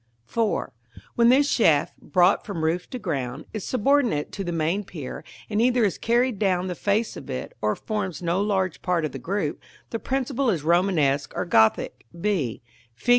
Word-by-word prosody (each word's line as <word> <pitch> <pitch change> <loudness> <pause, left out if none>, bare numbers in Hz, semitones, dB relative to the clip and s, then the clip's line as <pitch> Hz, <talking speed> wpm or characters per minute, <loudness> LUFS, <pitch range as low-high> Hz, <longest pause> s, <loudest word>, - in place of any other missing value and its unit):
§ 230 -2 0
IV. - - -25 0.4
When 235 0 +4
this 275 +3 +5
shaft, 160 - +2
brought 180 +5 +3
from 180 -6 -4
roof 170 +3 0
to 255 - -5
ground, 140 - -3
is 215 -4 -4
subordinate 250 - +1
to 195 - -4
the 175 - -3
main 170 +5 0
pier, 155 -8 -7 0.2
and 215 0 0
either 245 0 +3
is 200 -5 0
carried 240 -2 +1
down 185 -3 +1
the 185 - -2
face 205 +5 0
of 140 - -9
it, 130 -1 -5
or 105 0 +1
forms 205 -6 -3
no 175 +2 0
large 190 -4 0
part 175 -3 +1
of 150 - -3
the 135 - -7
group, 180 +1 -2 0.3
the 230 - -2
principle 265 0 -1
is 170 -9 0
Romanesque 160 -5 +2
or - - -1
Gothic, 110 -6 +2
b, 170 - -1 0.3
Fig. 125 - -7
185 Hz, 185 wpm, -25 LUFS, 155-220 Hz, 0.4 s, this